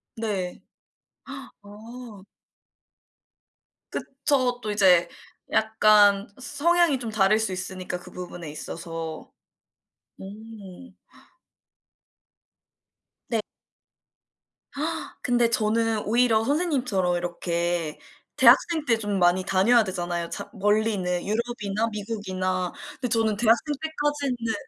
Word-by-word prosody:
네. 200 -5 -3 1.0
어. 215 0 -11 1.7
그쵸. 265 -2 -1
또 215 - -3
이제 180 -4 +4 0.4
약간 210 -2 +4
서 280 +3 -8
성향이 340 -5 +4
좀 235 -2 -5
다를 215 0 +3
수 220 -3 -1
있으니까 185 -1 -5
그 - - -13
부분에 175 -3 -8
있어서. 165 +1 -7 0.9
음. 210 +2 -11 2.3
네. 230 -2 0 1.8
근데 240 -1 +2
저는 225 0 +1
오히려 230 0 +3
선생님처럼 250 - 0
이렇게 170 -2 -2 0.4
대학생 320 -3 +5
때 230 -4 +3
좀 205 -3 -2
많이 175 +1 +3
다녀야 200 +5 +4
되잖아요 175 -3 -3
자 - - -6
멀리는. 210 -1 +1 0.2
유럽이나 220 -1 -2
미국이나. 185 -4 -3 0.3
근데 250 - -1
저는 225 -2 +1
대학생 235 +7 +2
때까지는 290 -7 -2
215 Hz, 200 characters per minute, -25 LUFS, 185-235 Hz, 2.3 s, 대학생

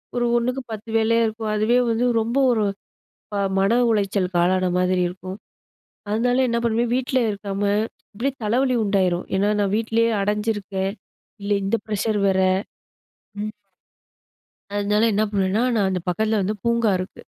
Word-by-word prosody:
ஒரு 240 0 +1
ஒன்னுக்கு 250 +3 -1
10 220 +1 -7
வேலையா 230 +1 +3
இருக்கும். 220 0 -4
அதுவே 220 +4 +2
வந்து 235 +2 +1 0.2
ரொம்ப 235 +4 -2
ஒரு 215 -3 +1 0.7
ப - - -2 0.2
மன 195 +3 +3 0.2
உளைச்சலுக்கு 195 -4 0
ஆளான 185 0 +2
மாதிரி 180 0 +2
இருக்கும். 185 +1 -8 0.8
அதனால 245 +3 +1
என்ன 235 - 0
பண்ணுவேன்? 235 +1 +1
வீட்ல 260 0 0
இருக்காம, 200 0 -5 0.5
இப்பிடியே 255 +6 -2
தலைவலி 250 +4 +1
உண்டாயிரும். 185 -3 +1
ஏன்னா, 200 +2 +2
நான் 200 0 +1
வீட்லேயே 230 +1 +1
அடஞ்சிருக்கேன், 205 -2 -1 0.5
இல்ல 200 +1 -4
இந்த 195 +4 +1
ப்ரஷர் 210 0 -1
வேற, 190 -1 +2 1.0
ம். 215 0 -3 1.2
அதனால 210 +2 +1
என்ன 215 +2 +2
பண்ணுவேன்னா, 195 +2 +1
நான் 200 -3 +2
அந்த 185 -1 -1
பக்கத்தில 215 +4 +1
வந்து 205 +3 -1
பூங்கா 235 -2 +2
இருக்கு. 185 - -7
210 Hz, 140 wpm, -22 LUFS, 195-230 Hz, 1.2 s, வேலையா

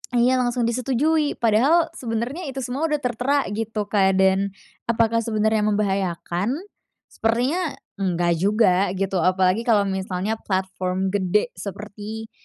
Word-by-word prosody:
Iya 250 +2 +4
langsung 245 -1 0
disetujui. 270 +6 +1
Padahal 280 +9 +3
sebenernya 245 +8 -3
itu 265 0 -4
semua 275 +7 -1
udah 300 -2 -1
tertera 250 +4 +1
gitu 220 0 -2
Kak, 195 -2 +3
dan 190 +1 +2 0.3
apakah 230 0 +2
sebenernya 220 -1 +1
membahayakan? 195 +1 -1 0.6
Sepertinya 265 +9 0 0.2
enggak 175 -3 +1
juga 195 -2 +3
gitu, 195 -1 -1
apalagi 185 +5 +2
kalo 210 -3 +4
misalnya 190 +2 -2
platform 190 0 -2
gede 205 +3 +1
seperti, 210 +3 -7
215 Hz, 120 wpm, -23 LUFS, 190-245 Hz, 0.6 s, Iya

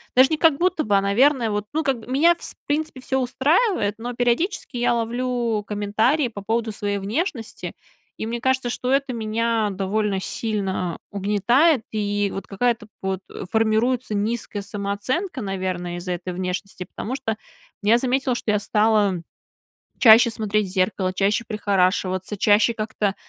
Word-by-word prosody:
даже 260 +1 +7
не 315 - 0
как 320 -3 +4
будто 355 -2 +1
бы, 205 -2 +3
а, - - +3
наверное, 235 +5 +3
вот, 205 0 -2
ну 315 +1 0
как, 265 -6 -1
меня 305 +7 +4
вс - - -8
в - - -67
принципе, 300 -1 -1
всё 265 +1 -1
устраивает, 265 - +1
но 240 +2 -5
периодически 245 - 0
я 240 0 +2
ловлю 235 -1 -1
комментарии 215 +8 +1
по 215 -3 -8
поводу 225 +2 -1
своей 205 0 -2
внешности. 225 - -3 0.4
И - - -4
мне 235 +1 -3
кажется, 260 0 +1
что 250 +1 -2
это 275 -2 +1
меня 225 -1 0
довольно 195 +1 -1
сильно 190 -5 -2
угнетает, 220 - +3
и 205 -1 0
вот 195 - -5
какая-то 230 +2 -1
под 190 0 -2 0.3
формируется 225 +2 +1
низкая 210 0 -2
самооценка, 205 - -3
наверно, 185 -3 -3
из-за 180 +1 -5
этой 180 +1 -5
внешности. 180 +1 -4
Потому 235 +7 -5
что 255 -5 -2 0.5
я 215 +3 +4
заметила, 255 0 0
что 225 - -1
я 210 - +2
стала 210 -3 +2 0.8
чаще 230 0 +8
смотреть 215 -2 0
в - - -9
зеркало, 185 0 0
чаще 200 +4 +1
прихорашиваться, 190 -2 0
чаще 210 +4 +4
как-то 215 -2 -2
220 Hz, 155 wpm, -23 LUFS, 200-250 Hz, 0.8 s, чаще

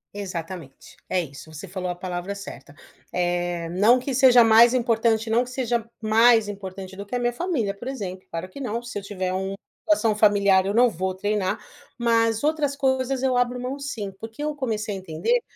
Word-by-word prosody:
Exatamente. 175 -6 -7
É 185 - +1
isso, 155 0 -7
você 155 +5 -8
falou 185 0 -4
a 175 - -2
palavra 180 +2 -5
certa. 145 - -10 0.4
Eh, 175 -1 -1
não 210 +8 +4
que 260 +1 -4
seja 250 -2 +7
mais 230 +2 +6
importante, 230 -2 +1
não 230 +3 +3
que 250 - -10
seja 245 -3 -1 0.2
mais 225 0 +5
importante 190 -1 -7
do 200 - -6
que 225 +5 -6
a - - 0
minha 240 0 0
família, 245 - -1
por 240 +6 -10
exemplo, 190 -8 -5
claro 165 +2 -5
que 185 - -11
não, 235 -2 -3
se 240 -4 -5
eu - - -9
tiver 185 -2 -3
um 190 +1 -2 0.3
uma 315 -1 +4
situação 220 -2 +1
familiar 200 -3 +4
eu 200 - -1
não 245 +1 +5
vou 185 0 -3
treinar. 200 0 -1 0.4
Mas 230 -1 +2
outras 300 -2 +1
coisas 265 -1 0
eu 260 -2 +1
abro 245 0 +1
mão 255 +3 -4
sim, 230 -8 -5
porque 225 +7 -9
eu 300 -1 -2
comecei 220 -6 -2
a - - -4
entender, 190 - 0
215 Hz, 200 wpm, -24 LUFS, 185-245 Hz, 0.4 s, seja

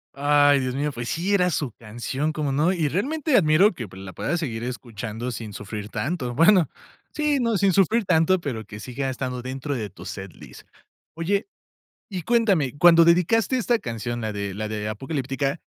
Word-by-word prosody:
Ay, 145 0 +4
Dios 130 -1 -2
mío, 145 +2 -1
pues, 120 -1 -5
sí, 180 +5 -1
era 180 -3 +3
su 145 -7 -2
canción, 120 +8 -4
¿cómo 150 -2 -2
no? 150 +6 +2
Y 165 -5 0
realmente 275 - 0
admiro 180 +2 +5
que, 120 -9 -6
pues, 95 - -12
la 95 - -8
puedas 145 - -2
seguir 115 -8 -4
escuchando 120 -1 -5
sin 110 -3 -7
sufrir 105 +1 -6
tanto. 125 +2 -3
Bueno, 170 - +5 0.4
sí, 300 -2 +1
no, 230 -4 +1
sin 195 0 +3
sufrir 200 +5 +3
tanto, 180 +1 +3
pero 130 -9 -4
que 105 0 -10
siga 135 +3 -4
estando 125 -1 -4
dentro 130 +3 -4
de 110 -6 -3
tu 90 - -13
set 95 -1 -7
list. - - -14 0.5
Oye, 195 - -1 0.6
y 185 -4 -5
cuéntame, 195 - +1
cuando 170 +1 +7
dedicaste 180 +9 +3
esta 240 -1 +1
canción, 120 - -4
la 110 -2 -3
de 100 -2 -4
la 110 +1 -4
de 105 -1 -3
"Apocalíptica", 135 +5 -3
140 Hz, 185 wpm, -24 LUFS, 115-180 Hz, 0.6 s, cuando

